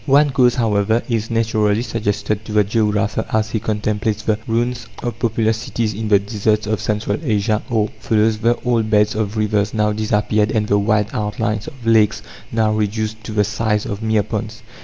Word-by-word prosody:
One 145 +1 +5
cause, 125 -3 +3
however, 110 -1 +1
is 115 -2 -1
naturally 110 -1 +1
suggested 105 -2 -2
to - - -7
the 105 -1 +4
geographer 105 0 0
as 110 0 0
he 110 - 0
contemplates 105 0 -1
the 110 -1 0
ruins 120 +1 -1 0.2
of 120 -2 -4
populous 110 -1 +1
cities 110 -1 -2
in 110 +2 -4
the 105 -1 +5
deserts 105 +1 0
of 110 0 -1
Central 105 +4 -1
Asia, 105 -5 0
or 110 -2 +1
follows 110 0 +1
the 115 +2 +2
old 115 -3 +1
beds 105 -1 +3
of 110 0 -2
rivers 105 -1 0
now 105 -1 +2
disappeared 105 0 +1
and 110 -1 +1
the 100 0 +3
wide 105 0 +1
outlines 105 0 -2
of 130 -4 -10
lakes 110 -2 +3 0.3
now 110 -1 +2
reduced 110 +1 -2
to - - -5
the 105 -1 +2
size 105 0 -1
of 100 +1 -4
mere 110 -1 +1
ponds. 110 +2 -5
110 Hz, 185 wpm, -19 LUFS, 105-115 Hz, 0.3 s, One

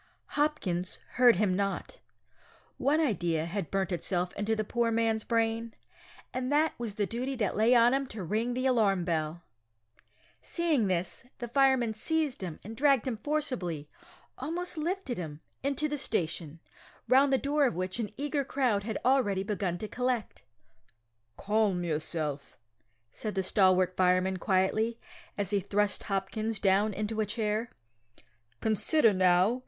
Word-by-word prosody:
Hopkins 195 - -1
heard 245 -3 +6
him 190 -1 +1
not. 195 0 -3 0.8
One 295 +3 +2
idea 175 - 0
had 175 0 -4
burnt 195 -1 -1
itself 180 0 -1
into 215 +2 -1
the 215 - -1
poor 235 +2 0
man's 225 -1 +1
brain, 230 0 0 0.6
and 255 +1 -2
that 305 +2 +3
was 225 -4 -4
the 210 - 0
duty 250 +6 -3
that 215 -6 -1
lay 225 +4 +4
on 240 +1 +6
him 275 0 0
to 215 -5 -7
ring 225 +7 -1
the 255 +1 -1
alarm 205 -8 +2
bell! 165 0 -2 1.0
Seeing 315 - +1
this, 185 +6 -2
the 240 - -5
fireman 260 -2 +3
seized 305 +3 -1
him, 175 -5 -5
and 220 +3 -8
dragged 275 -2 +3
him 250 -4 -2
forcibly 255 - -2 0.5
almost 340 +7 -3
lifted 330 - -2
him 155 -4 -6 0.2
into 280 +2 -1
the 295 -1 -3
station, 165 - -2 0.5
round 270 +3 +5
the 265 - +4
door 285 +1 +2
of 240 - -3
which 185 +4 -3
an 215 -3 -2
eager 290 0 -1
crowd 250 -7 0
had 220 -1 -3
already 245 -8 +3
begun 195 -4 -2
to 215 - -5
collect. 250 -1 -2 1.0
"Calm 205 -3 +1
yourself," 155 -3 -3 0.5
said 215 -2 -5
the 190 - 0
stalwart 185 -2 +3
fireman 185 +1 +2
quietly, 210 +5 +1 0.4
as 200 -1 -1
he 205 - +3
thrust 205 +2 0
Hopkins 215 +2 -2
down 200 +2 +3
into 215 +2 -2
a - - +1
chair. 220 +1 -1 0.9
"Consider 225 +3 +3
now. 185 +5 +3
215 Hz, 150 wpm, -30 LUFS, 185-255 Hz, 1.0 s, heard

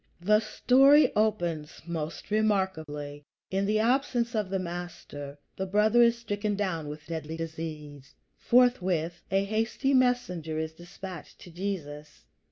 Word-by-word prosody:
The 210 +5 +4
story 270 +7 +5
opens 175 -8 -1
most 165 +2 -5
remarkably. 160 -9 -1 0.3
In 195 +1 0
the 215 +1 +2
absence 240 +1 +1
of 210 -4 -1
the 195 - 0
Master, 170 -5 -6 0.2
the 190 - -3
brother 210 +4 +4
is 235 0 +5
stricken 210 -2 -2
down 185 -7 -2
with 150 0 -8
deadly 160 -1 -5
disease. 155 -4 -7 0.2
Forthwith 185 -9 +2
a 195 +1 +2
hasty 225 +6 0
messenger 245 - +1
is 160 0 -3
dispatched 175 +2 -10
to 175 - -12
Jesus. 155 -5 -6
185 Hz, 130 wpm, -28 LUFS, 160-215 Hz, 0.3 s, story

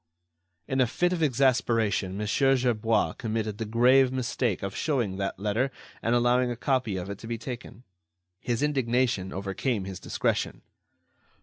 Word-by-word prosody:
In 130 0 +1
a 125 - +4
fit 175 +9 +1
of 175 - -2
exasperation 115 -8 +2
Mon. 105 - -2
Gerbois 120 -2 +2
committed 110 -2 -2
the 110 - -2
grave 125 +4 +5
mistake 125 -6 -1
of 95 0 -4
showing 120 -11 -1
that 95 0 -2
letter 105 +6 0 0.3
and 115 +1 +1
allowing 120 +1 +3
a 120 - -2
copy 125 -5 0
of 90 0 -4
it 100 - -7
to 115 - -9
be 115 0 -3
taken. 120 0 -8 0.6
His 120 +2 -1
indignation 125 -8 +1
overcame 100 +3 -2
his 95 -2 -6
discretion. - - -2
120 Hz, 150 wpm, -27 LUFS, 105-130 Hz, 0.6 s, grave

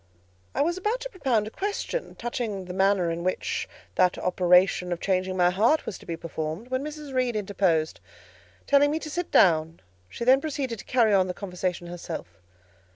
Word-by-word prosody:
I - - +3
was 345 +4 -1
about 430 +6 0
to - - -6
propound 255 - 0
a 215 - -7
question, 410 - -3
touching 230 -5 -4
the 180 - -6
manner 190 -2 +2
in 170 +1 -4
which 185 +1 -2 0.2
that 180 -1 +3
operation 180 0 +3
of 175 - -2
changing 185 0 0
my 180 0 +4
heart 225 +12 +2
was - - -5
to - - -16
be 165 - -3
performed, 165 +6 -5
when 260 +1 0
Mrs. 300 -2 -7
Reed 255 -2 +1
interposed, 190 -6 0 0.7
telling 285 0 +5
me 305 - 0
to 315 -1 -6
sit 350 +2 -3
down; 165 -2 +4 0.3
she 235 - -5
then 260 +2 +6
proceeded 275 -7 -3
to - - -10
carry 230 -4 +3
on 190 -2 +4
the 180 - -4
conversation 180 -2 -3
herself. 170 - -7
200 Hz, 185 wpm, -26 LUFS, 180-270 Hz, 0.7 s, then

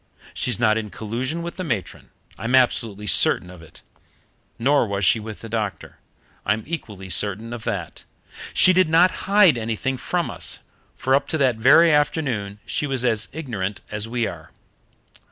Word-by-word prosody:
She's 120 -3 -1
not 110 -2 +3
in 105 -1 -6
collusion 125 +11 -4
with 170 +1 -6
the 185 - -3
matron. 115 - -4 0.3
I'm 115 +3 0
absolutely 115 -5 +1
certain 90 -2 +2
of 90 -2 -13
it. 80 - -16 0.7
Nor 135 +1 +2
was 100 -1 -1
she 115 - +4
with 110 0 -8
the 115 - -8
doctor. 110 -3 -4 0.4
I'm 110 +1 0
equally 105 - -6
certain 105 +5 +1
of 115 -2 -7
that. - - -4 0.5
She 185 - +5
did 185 -2 +3
not 170 +3 +5 0.2
hide 195 - +5
anything 115 +4 -2
from 175 +5 -2
us, - - -3 0.3
for 130 - 0
up 140 +1 +2
to 160 - 0
that 130 -5 +2
very 150 +8 +6
afternoon 135 -9 0
she 120 +11 -2
was 130 -3 -2
as 110 -3 0
ignorant 110 -10 -4
as 105 +1 -3
we 120 0 -1
are. 80 -5 -7
115 Hz, 170 wpm, -22 LUFS, 105-145 Hz, 0.7 s, very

